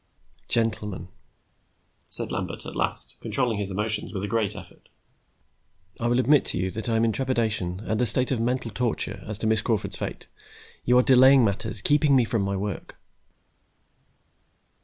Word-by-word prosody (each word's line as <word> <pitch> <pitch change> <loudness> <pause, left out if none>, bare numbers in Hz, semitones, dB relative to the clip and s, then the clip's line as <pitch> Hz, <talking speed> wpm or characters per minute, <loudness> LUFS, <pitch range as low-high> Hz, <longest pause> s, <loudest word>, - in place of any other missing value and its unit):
"Gentlemen," 110 -4 -2 1.0
said - - +8
Lambert - - -4
at - - -8
last, - - -2
controlling 120 -5 +1
his 100 -1 -3
emotions 105 +2 0
with 95 -2 -5
a - - -2
great 110 -2 -1
effort. - - -13 1.1
"I 120 - -1
will 120 +1 +1
admit 140 +3 +3
to - - -3
you 95 +1 -2
that 110 +3 -5
I 115 - 0
am 115 +1 +2
in 115 - +1
trepidation 110 -8 -2
and 110 +2 -1
a 125 - +2
state 125 +4 0
of 130 - -1
mental 120 0 -2
torture 120 +2 -3
as 105 -1 -5
to 110 - -5
Miss 110 0 +1
Crawford's 110 -3 -2
fate. - - -6 0.6
You 125 +1 +3
are 125 - +5
delaying 130 0 +6
matters, 105 +1 -3
keeping 145 +1 +2
me 125 -3 +3
from 115 -1 -2
my 100 0 -2
work." 100 +1 -6
115 Hz, 170 wpm, -24 LUFS, 105-125 Hz, 1.1 s, said